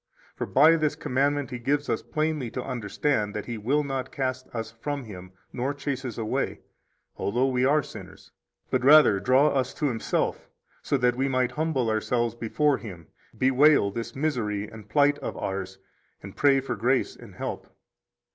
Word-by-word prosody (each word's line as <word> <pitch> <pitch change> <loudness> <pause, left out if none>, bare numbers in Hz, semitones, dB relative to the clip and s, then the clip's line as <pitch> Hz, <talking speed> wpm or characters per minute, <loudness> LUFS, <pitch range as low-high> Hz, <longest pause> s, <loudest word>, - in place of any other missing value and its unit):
For - - -4
by 155 +5 +6
this 155 -2 0
commandment 140 +1 0
He 125 - -5
gives 145 +4 0
us - - -1
plainly 155 -5 -2
to 125 - -2
understand 115 -2 -1
that 105 -1 -4
He 115 -2 -5
will 140 +8 +1
not 135 -2 -4
cast 130 -1 -3
us 110 -2 -5
from 145 +1 -3
Him 90 -5 -10 0.2
nor 130 +3 -2
chase 140 -2 -3
us 120 -4 -5
away, 110 -2 -2 0.6
although 120 +6 +1
we 130 -1 +1
are 145 +2 +3
sinners, - - -12 0.4
but 130 -1 +1
rather 140 -7 +7
draw 130 +8 +4
us 130 -2 -1
to - - -2
Himself, 115 -3 -2 0.3
so 140 - 0
that 125 -1 +2
we 135 +2 0
might 130 -2 +1
humble 150 -3 -1
ourselves 115 +1 0
before 135 +5 0
Him, 90 -8 -10 0.3
bewail 130 -4 +4
this 115 +2 -6
misery 115 -8 -1
and 105 -1 -12
plight 145 +2 +3
of - - -5
ours, 95 0 -4 0.5
and 100 0 -10
pray 140 -2 +4
for 130 -2 -3
grace 125 +5 +1
and - - -14
help. - - -5
130 Hz, 175 wpm, -26 LUFS, 115-145 Hz, 0.6 s, rather